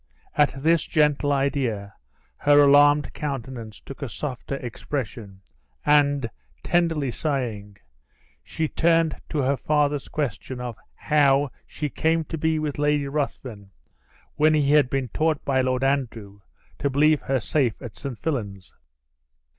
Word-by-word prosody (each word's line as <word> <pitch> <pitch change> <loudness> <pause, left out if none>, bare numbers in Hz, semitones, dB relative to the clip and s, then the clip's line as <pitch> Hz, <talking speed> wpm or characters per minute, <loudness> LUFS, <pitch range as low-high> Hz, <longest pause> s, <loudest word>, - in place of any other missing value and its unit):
At 140 -2 +1
this 165 +1 +3
gentle 150 -1 +2
idea, 130 -7 -1 0.4
her 145 0 +5
alarmed 145 +1 +5
countenance 125 -6 -5
took 135 - -11
a 140 - -3
softer 135 +1 -5
expression; 120 -5 -6 0.4
and, 145 -3 +3 0.4
tenderly 165 -6 +1
sighing, 115 -9 -3 0.7
she 160 - -2
turned 165 0 +2
to 150 -4 -1
her 135 +2 +2
father's 145 +1 0
question 130 -2 -4
of 120 -2 -5 0.2
"How 145 -2 +2 0.2
she 150 - -4
came 160 +3 0
to - - -1
be 160 +1 +1
with 150 -2 -3
Lady 145 -1 +1
Ruthven, 130 -8 -4 0.7
when 155 +1 +4
he 145 -2 +2
had 145 -4 +5
been 135 -2 -2
taught 155 +4 0
by 135 -2 +2
Lord 130 0 0
Andrew 115 -7 -2 0.4
to 140 - 0
believe 150 +2 +3
her 135 -1 0
safe 125 -2 0
at 120 -7 -9
St. 135 -4 -6
Fillan's?" 105 - -4
140 Hz, 135 wpm, -24 LUFS, 125-150 Hz, 0.7 s, her